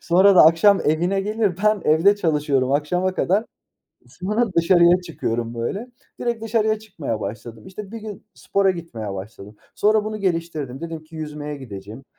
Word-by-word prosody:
sonra 190 +3 +5
da 180 - +8
akşam 180 +5 +5
evine 175 +6 +1
gelir, 210 -2 0
ben 215 -1 +3
evde 165 +7 +4
çalışıyorum 145 -7 0
akşama 180 +6 0
kadar, 200 +5 +1 0.6
sonra 210 +4 -2
dışarıya 175 +1 +5
çıkıyorum 120 -9 -4
böyle, 195 - -4 0.3
direkt 235 -2 -2
dışarıya 220 -1 +1
çıkmaya 170 - -5
başladım. 110 +2 -7
İşte 200 +1 -9
bir 230 - -5
gün 210 -2 -9
spora 195 -1 +1
gitmeye 120 - -6
başladım, 100 +1 -9 0.2
sonra 215 0 +2
bunu 215 0 -4
geliştirdim, 165 -9 -3
dedim 165 -1 -6
ki 160 +1 -13
yüzmeye 150 -1 -6
gidecegim, 110 -1 -10
170 Hz, 155 wpm, -22 LUFS, 140-200 Hz, 0.6 s, da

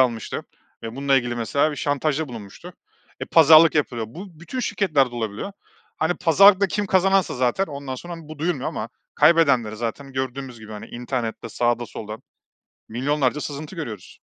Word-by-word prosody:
almıştı 120 -4 0 0.4
ve 115 +2 -7
bununla 140 0 +2
ilgili 120 -2 0
mesela 140 +6 +1
bir 145 - -6
şantajda 145 +1 -1
bulunmuştu. 110 -5 -10 0.5
Eee, - - -4
pazarlık 160 0 +8
yapılıyor. 120 -6 0
Bu 170 - -11
bütün 250 +9 -5
şirketlerde 145 - +1
olabiliyor. 115 - -4 0.4
Hani, 160 +2 0
pazarlıkta 195 +4 +5
kim 205 +2 -2
kazanansa 190 0 +2
zaten 130 +10 +1
ondan 140 -4 -6
sonra, 175 +7 -7
hani, 165 -2 -12
bu 155 -1 -9
duyulmuyor 155 -3 -1
ama 110 - -5 0.3
kaybedenleri 140 -9 +4
zaten 120 +5 -5
gördüğümüz 130 -1 -4
gibi 110 0 -10
hani, 105 - -8
internette 120 -2 -4
sağda 120 +1 0
solda 110 0 -8 0.7
milyonlarca 140 +4 0
sızıntı 150 +5 -6
görüyoruz. 115 - -7
140 Hz, 155 wpm, -23 LUFS, 120-160 Hz, 0.7 s, pazarlık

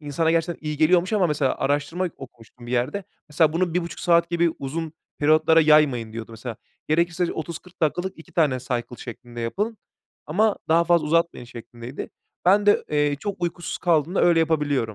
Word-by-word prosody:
insana 150 +2 0
gerçekten 165 -1 -1
iyi 150 0 -2
geliyormuş 175 +5 +3
ama, 200 -4 +3
mesela, 150 -4 0
araştırma 145 +6 -1
okumuştum 120 -2 -13
bir 120 - -6
yerde. 130 +11 -1 0.2
Mesela, 155 +1 +3
"Bunu 170 0 0
1,5 170 -4 -3
saat 170 -1 +3
gibi 170 0 +2
uzun 155 +3 -4 0.3
periyotlara 155 +2 +4
yaymayın." 150 -8 +3
diyordu, 115 0 -7
mesela. 115 0 -7 0.3
Gerekirse 170 +2 +1
30-40 170 +3 -8
dakikalık 175 +4 -1
2 170 +2 -15
tane 150 -6 +2
cycle 120 -1 -4
şeklinde 120 -1 -9
yapın 205 - -2 0.5
ama 205 +7 +2
daha 165 +1 +4
fazla 170 -2 +3
uzatmayın, 165 -4 +1
şeklindeydi. 120 +1 -9 0.3
Ben 200 +3 +4
de, 205 - +4
eee, 145 -1 +1
çok 200 -3 -5
uykusuz 175 0 -3
kaldığımda 170 0 +1
öyle 170 -1 +5
yapabiliyorum. 145 -8 0
155 Hz, 165 wpm, -23 LUFS, 135-175 Hz, 0.5 s, öyle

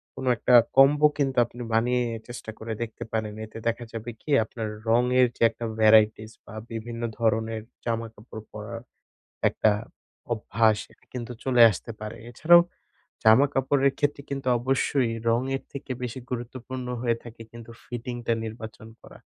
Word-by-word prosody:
কোন - - -6
একটা 125 - +1 0.2
কম্বো 145 +3 +7
কিন্তু 135 -3 0
আপনি 120 +1 -11
বানিয়ে 125 +2 +2 0.2
চেষ্টা 120 -2 -7
করে 110 0 -4
দেখতে 120 0 -5
পারেন। 110 -1 -1
এতে 110 - -11
দেখা 115 +1 -1
যাবে 115 +1 -5
কি - - -13
আপনার 110 0 -5 0.2
রঙের 125 +2 +4
যে - - -21
একটা 115 +1 -7
ভ্যারাইটিস 110 0 +5
বা - - -12 0.2
বিভিন্ন 115 +1 -5 0.2
ধরনের 110 0 0 0.2
জামাকাপড় 115 -1 -5
পরার 115 +2 -7 0.7
একটা 110 - +2 0.6
অভ্যাস 110 -1 +2 0.4
কিন্তু 125 -1 -5
চলে 125 -2 +3
আসতে 105 +4 -7
পারে। 110 +1 -6
এছাড়াও 170 +8 +7 0.6
জামা 110 +6 +7
কাপড়ের 135 +1 +2
ক্ষেত্রে 145 -1 0
কিন্তু 135 -1 -4
অবশ্যই 130 0 +1 0.2
রঙের 130 +4 0
থেকে 140 -1 -7
বেশি 125 +1 -4
গুরুত্বপূর্ণ 125 +1 -5
হয়ে 120 -2 +1
থাকে 115 -1 -11
কিন্তু 115 0 -11
ফিটিংটা 120 -1 -3
নির্বাচন 110 -1 -8
করা। - - -14
120 Hz, 145 wpm, -26 LUFS, 110-130 Hz, 0.7 s, কম্বো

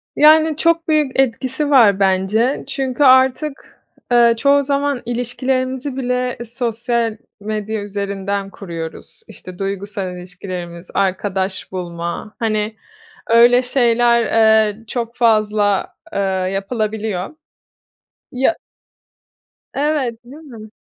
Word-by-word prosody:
Yani, 310 0 +5
çok 335 0 +1
büyük 300 -4 +1
etkisi 260 +3 0
var 220 -8 +5
bence. 195 +7 +1
Çünkü 270 0 -1
artık, 260 +2 +2 0.3
ııı, 235 -1 +5
çoğu 280 +4 +3
zaman 280 -1 -1
ilişkilerimizi 255 +2 -2
bile 250 -1 -1
sosyal 235 -1 -2 0.2
medya 215 +1 -3
üzerinden 200 -1 -3
kuruyoruz. 170 - -8
İşte, 180 -1 -12
duygusal 195 -1 -4
ilişkilerimiz, 180 -1 -8
arkadaş 190 0 -1
bulma. 170 +2 -5
Hani, 215 -1 -1 0.5
öyle 240 +2 +6
şeyler, 240 -2 +2 0.4
eee, 215 +2 -7
çok 235 0 -4
fazla, 215 -4 +1 0.2
eee, - - -1 0.3
yapılabiliyor. 215 - -3 1.0
Ya 265 +6 +1 1.2
Evet, 275 -6 -1
değil 255 +4 -12
mi? 225 -7 -11
230 Hz, 100 wpm, -18 LUFS, 200-260 Hz, 1.2 s, öyle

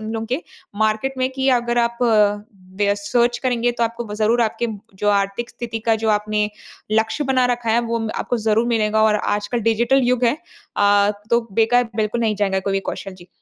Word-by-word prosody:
उन 220 0 -6
लोगों 225 0 -3
के 255 +8 -2 0.4
मार्केट 220 +5 0
में 255 0 +1
कि 265 0 -1
अगर 240 -1 +1
आप 235 +1 0
अ, 210 -3 +3 0.4
दे 200 0 +3
सर्च 240 +4 +1
करेंगे 245 -2 +1
तो - - +1
आपको 230 +1 -4
ब 210 -2 -7
ज़रूर 220 +3 +2
आपके 230 +1 -1 0.3
जो 205 +2 -1
आर्थिक 200 +4 0
स्थिति 230 -1 -5
का 225 - +4
जो 220 - +1
आपने 210 0 0 0.4
लक्ष्य 220 +6 +1
बना 260 -1 +2
रखा 240 -2 -1
है। 230 +2 +3
वो 235 -1 -2
म 225 -1 -3
आपको 245 - -2
ज़रूर 220 +1 +1
मिलेगा 220 -2 +1
और 220 -1 +4
आजकल 210 +3 -2
डिजिटल 230 +4 +2
युग 250 0 +1
है, 235 +3 +3 0.4
अ, 205 0 +4 0.2
तो 235 0 +4
बेकार 230 +4 +3
बिल्कुल 215 +2 -1
नहीं 220 -3 0
जाएगा 190 -1 0
कोई 195 +1 -2
भी 195 - +1
कौशल। 195 -1 -7
जी। 175 -1 -15
225 Hz, 210 wpm, -20 LUFS, 210-240 Hz, 0.4 s, का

